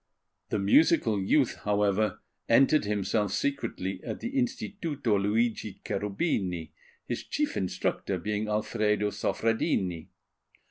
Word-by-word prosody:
The - - 0
musical 110 - +4
youth, 125 +7 +2
however, 105 0 +1 0.3
entered 135 +3 +5
himself 105 0 0
secretly 95 -9 -2
at - - -5
the 240 - -4
Instituto 170 - -1
Luigi 105 0 0
Cherubini, 100 - -1 0.4
his 120 - -3
chief 300 0 -1
instructor 95 0 -1
being 105 +4 -2
Alfredo 105 -1 0
Soffredini. 95 -7 -1
105 Hz, 100 wpm, -28 LUFS, 100-120 Hz, 0.4 s, entered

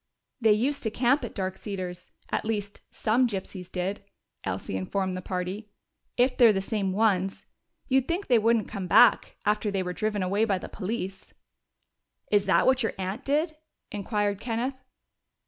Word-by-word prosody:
"They 220 -2 +6
used 265 +7 0
to 220 - 0
camp 250 +5 +2
at 235 - -6
Dark 190 -1 -2
Cedars 185 -4 -6 0.2
at - - 0
least, 205 -2 -3
some 240 +3 +2
gypsies 190 -3 -6
did," 190 +3 -3 0.4
Elsie 95 0 -3
informed 185 - -1
the 185 - -4
party. 185 +4 -4 0.5
"If 250 +1 +3
they're 235 -3 +8
the 195 - 0
same 195 -1 -1
ones, 195 -2 +1 0.4
you'd 265 -1 +2
think 355 +4 -1
they 240 -2 +4
wouldn't 225 0 +2
come 190 -2 -5
back, - - +5
after 210 +1 +1
they 195 -2 -1
were 180 0 -3
driven 210 0 -1
away 200 +4 +1
by 205 -4 +2
the - - -7
police." 195 -2 -5 1.0
"Is 205 -1 +3
that 190 - +4
what 260 0 +4
your 225 - 0
aunt 190 +7 -4
did?" 310 +3 +1 0.3
inquired 205 -1 -1
Kenneth. 240 +3 -2
205 Hz, 165 wpm, -27 LUFS, 190-235 Hz, 1.0 s, they're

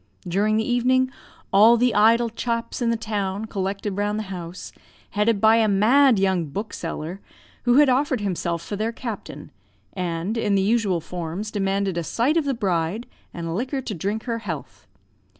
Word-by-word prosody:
During 205 +5 +1
the 220 - 0
evening, 255 +1 +2 0.4
all 220 +4 +7
the 245 +1 +2
idle 230 +2 +4
chaps 230 +1 -3
in 235 - +2
the 230 - +1
town 210 -2 -3
collected 195 0 -3
round 205 +1 0
the 215 - -2
house, 175 0 -7 0.4
headed 210 0 +1
by 220 +2 +5
a 225 -1 +3
mad 230 +6 +5
young 190 -3 +1
bookseller, 175 0 -5 0.5
who 240 0 +4
had 295 +1 +6
offered 260 0 +2
himself 175 -4 -2
for 205 - -5
their 215 +3 -1
captain, 230 -2 -7 0.4
and, 180 +4 -2
in 205 -3 +1
the 195 - +2
usual 205 -5 +1
forms, 175 +5 -5
demanded 195 -3 0
a - - -3
sight 240 - 0
of 325 -3 +2
the 275 -2 0
bride, 190 0 -1 0.3
and 165 -1 -4
liquor 260 +6 -2
to 240 -4 -5
drink 205 +5 -3
her 230 -2 -2
health. 165 - -7
210 Hz, 170 wpm, -23 LUFS, 190-230 Hz, 0.5 s, all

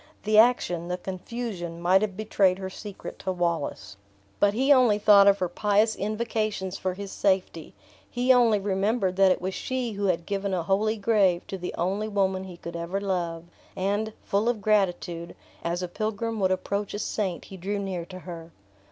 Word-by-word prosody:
The 215 0 +4
action, 180 -8 +3
the 180 0 -2
confusion 185 -2 -5
might 185 +3 +4
have 200 -3 -2
betrayed 200 -4 +2
her 190 -1 -6
secret 205 0 -9
to 190 - -2
Wallace. 170 - -2 0.4
But 205 0 +3
he 270 +4 +5
only 245 -6 +4
thought 205 -1 +6
of 200 0 +6
her 185 - 0
pious 210 +4 +2
invocations 215 -2 -2
for 185 -1 -3
his 200 0 -7
safety; 190 -5 -1 0.3
he 250 +1 +3
only 235 -4 +4
remembered 195 0 0
that 195 -1 +6
it - - +1
was 185 +1 -3
she 255 +1 -3
who 200 -1 -3
had 170 -2 0
given 200 0 -2
a 175 - -1
holy 210 +5 +1
grave 200 -5 +2
to 195 - -5
the 180 - -5
only 195 +5 -1
woman 190 -2 0
he 180 -2 -10
could 170 0 -8
ever 170 +3 -3
love; 175 -4 -2 0.3
and, 205 +3 -1
full 205 +4 +1
of 240 -3 -1
gratitude, 175 -5 0 0.3
as 175 +2 -2
a - - -2
pilgrim 220 +4 -3
would 190 -1 +2
approach 200 +2 -2
a - - -3
saint, 200 -4 -2
he 195 - -10
drew 195 +3 -3
near 190 -3 -3
to 185 +1 -9
her. 170 -2 -8
195 Hz, 185 wpm, -26 LUFS, 180-215 Hz, 0.4 s, thought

